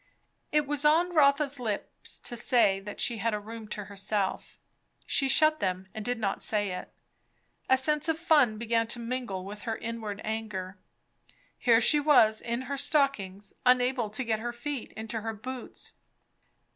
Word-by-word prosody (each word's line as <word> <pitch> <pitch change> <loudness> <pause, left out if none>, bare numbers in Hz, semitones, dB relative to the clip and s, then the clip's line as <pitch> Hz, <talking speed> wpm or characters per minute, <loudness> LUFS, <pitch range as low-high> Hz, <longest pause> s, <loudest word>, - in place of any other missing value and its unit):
It 300 -1 +2
was 290 0 -1
on 335 +4 +4
Rotha's 280 -2 +3
lips 215 -4 -5
to 240 - -4
say 230 -5 +3
that 205 +1 -9
she 235 - +1
had 225 +1 0
a - - -3
room 220 +1 -9
to 210 0 -5
herself; 200 0 -3 0.5
she 275 -1 +1
shut 310 +2 +4
them 185 -2 -2
and 220 - -5
did 245 +2 -1
not 200 -3 -2
say 205 -3 0
it. 180 - -6 0.8
A 260 - +6
sense 300 +4 +1
of 320 - +1
fun 295 -10 +3
began 230 0 0
to 235 +1 -1
mingle 235 -6 -4
with 205 +1 -8
her 225 -1 -3
inward 220 -3 -5
anger. 210 -4 -4 0.8
Here 230 -3 +5
she 295 +5 +5
was 255 -8 +5
in 235 +2 -3
her 280 +2 -4
stockings, 270 -10 0
unable 250 -2 +3
to 215 +5 -2
get 225 -3 -1
her 240 +2 -3
feet 260 +1 -5
into 220 0 -5
her 225 0 -4
boots. 255 +3 -8
230 Hz, 170 wpm, -28 LUFS, 210-270 Hz, 0.8 s, A